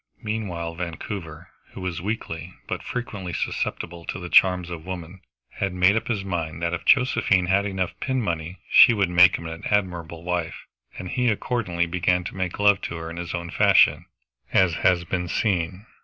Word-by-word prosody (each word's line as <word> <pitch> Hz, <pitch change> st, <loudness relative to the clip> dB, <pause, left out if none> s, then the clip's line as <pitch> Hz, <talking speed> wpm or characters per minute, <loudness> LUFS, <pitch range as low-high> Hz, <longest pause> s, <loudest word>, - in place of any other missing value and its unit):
Meanwhile 95 Hz, -7 st, -3 dB
Vancouver, 85 Hz, -1 st, -6 dB, 0.2 s
who -, -, -8 dB
was 90 Hz, -2 st, -3 dB
weakly 90 Hz, -4 st, -5 dB
but -, -, -3 dB
frequently 105 Hz, -7 st, -5 dB
susceptible 85 Hz, 0 st, -3 dB
to -, -, -4 dB
the 90 Hz, 0 st, -7 dB
charms 90 Hz, -2 st, +4 dB
of 80 Hz, -2 st, -6 dB
woman, 90 Hz, 0 st, -7 dB, 0.4 s
had 100 Hz, -2 st, -1 dB
made 90 Hz, +3 st, +4 dB
up 110 Hz, -, -1 dB
his 105 Hz, -5 st, -2 dB
mind 85 Hz, -4 st, -3 dB
that 85 Hz, 0 st, 0 dB
if 85 Hz, -, -4 dB
Josephine 125 Hz, -8 st, +3 dB
had 100 Hz, +2 st, +2 dB
enough 95 Hz, -3 st, -2 dB
pin 130 Hz, -1 st, -1 dB
money 85 Hz, -4 st, -3 dB
she 115 Hz, -, +7 dB
would 100 Hz, -4 st, +1 dB
make 90 Hz, +1 st, +7 dB
him 85 Hz, -, -7 dB
an 80 Hz, 0 st, -7 dB
admirable 85 Hz, -5 st, -1 dB
wife, 90 Hz, -2 st, -3 dB, 0.3 s
and 90 Hz, -, -6 dB
he 125 Hz, +4 st, 0 dB
accordingly 105 Hz, -6 st, -1 dB
began 90 Hz, +1 st, +1 dB
to 90 Hz, -, -7 dB
make 95 Hz, -2 st, -3 dB
love 105 Hz, -2 st, +4 dB
to -, -, -5 dB
her 80 Hz, 0 st, -6 dB
in 85 Hz, -, -8 dB
his 85 Hz, 0 st, -4 dB
own 85 Hz, -1 st, -5 dB
fashion, -, -, +4 dB, 0.5 s
as 95 Hz, -3 st, +4 dB
has 85 Hz, 0 st, +2 dB
been 90 Hz, +1 st, -2 dB
seen. 90 Hz, 0 st, -1 dB
90 Hz, 185 wpm, -24 LUFS, 85-100 Hz, 0.5 s, she